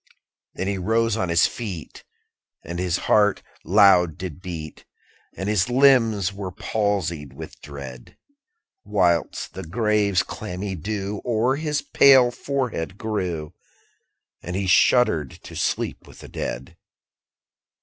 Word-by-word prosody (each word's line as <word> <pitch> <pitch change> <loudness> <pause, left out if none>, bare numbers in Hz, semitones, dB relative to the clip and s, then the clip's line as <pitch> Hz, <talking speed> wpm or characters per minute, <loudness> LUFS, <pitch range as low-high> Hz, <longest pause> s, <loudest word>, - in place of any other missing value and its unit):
10. 95 - -3
Then - - -3
he 100 -1 -1
rose 115 +3 +1
on 95 -5 -1
his 85 0 +4
feet, 95 -9 -6 0.6
And 85 +1 -5
his 90 -1 0
heart 105 -2 +3 0.2
loud 90 -4 +5
did 90 -2 -7
beat, 80 -5 -7 0.5
And 95 +3 -4
his 105 0 +1
limbs 120 -7 +4
they - - -14
were 95 -2 -5
palsied 95 -7 -2
with - - -10
dread; 70 -4 -10 0.7
_55 - - -15
Whilst 85 -2 +1
the 95 - -6
grave's 105 +1 +1
clammy 95 +2 -6
dew 100 +3 -4
O'er 120 +2 +1
his 150 -1 -2
pale 130 -3 +6
forehead 120 - -3
grew; 90 -9 -3 0.9
And 90 - -5
he 100 0 -1
shuddered 90 - +3
to - - -11
sleep - - -2
with - - -15
the - - -11
dead. 65 +1 -6
95 Hz, 135 wpm, -23 LUFS, 85-110 Hz, 0.9 s, pale